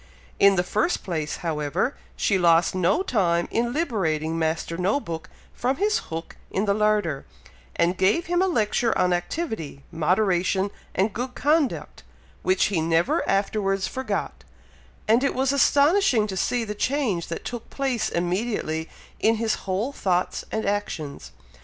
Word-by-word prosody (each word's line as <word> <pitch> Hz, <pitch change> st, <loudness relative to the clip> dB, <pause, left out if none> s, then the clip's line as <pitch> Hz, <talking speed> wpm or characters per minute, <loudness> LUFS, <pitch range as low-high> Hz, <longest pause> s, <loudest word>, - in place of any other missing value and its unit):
In 200 Hz, 0 st, +6 dB
the 175 Hz, -, +2 dB
first 215 Hz, -, 0 dB
place, 160 Hz, -5 st, -3 dB
however, 160 Hz, -, -1 dB, 0.2 s
she 195 Hz, -2 st, +1 dB
lost 170 Hz, -1 st, +4 dB
no 185 Hz, -, +2 dB
time 175 Hz, -, +1 dB
in 235 Hz, +1 st, 0 dB
liberating 165 Hz, -, -1 dB
Master 160 Hz, +1 st, -1 dB
No 190 Hz, +9 st, +1 dB
book 165 Hz, -, -6 dB, 0.2 s
from 255 Hz, +3 st, 0 dB
his 420 Hz, +5 st, +1 dB
hook 165 Hz, 0 st, -6 dB
in 195 Hz, -, -1 dB
the 200 Hz, -, +2 dB
larder, 210 Hz, -9 st, +1 dB, 0.5 s
and 170 Hz, +2 st, +2 dB
gave 205 Hz, -, +2 dB
him 350 Hz, +1 st, +1 dB
a 380 Hz, -, +3 dB
lecture 230 Hz, -, +1 dB
on 180 Hz, -1 st, +3 dB
activity, 175 Hz, -, -3 dB
moderation, 185 Hz, +3 st, +1 dB, 0.2 s
and 195 Hz, +2 st, +1 dB
good 250 Hz, +2 st, -4 dB
conduct, 295 Hz, -1 st, 0 dB, 0.4 s
which 370 Hz, -, +2 dB
he 180 Hz, -6 st, 0 dB
never 165 Hz, +1 st, +2 dB
afterwards 195 Hz, -1 st, +1 dB
forgot; 260 Hz, +7 st, -3 dB, 0.6 s
and 230 Hz, +4 st, +4 dB
it 275 Hz, -, +1 dB
was 265 Hz, +1 st, +2 dB
astonishing 285 Hz, -, +4 dB
to 195 Hz, -3 st, -5 dB
see 240 Hz, +6 st, 0 dB
the 210 Hz, -2 st, -4 dB
change 215 Hz, -, -1 dB
that 170 Hz, -, -6 dB
took 240 Hz, -2 st, -6 dB
place 265 Hz, -4 st, -1 dB
immediately 175 Hz, -3 st, -1 dB, 0.3 s
in 225 Hz, +1 st, +3 dB
his 225 Hz, -1 st, 0 dB, 0.2 s
whole 205 Hz, +9 st, 0 dB
thoughts 185 Hz, -9 st, -1 dB
and 220 Hz, -, -2 dB
actions. 195 Hz, -8 st, -3 dB
200 Hz, 150 wpm, -24 LUFS, 170-245 Hz, 0.6 s, In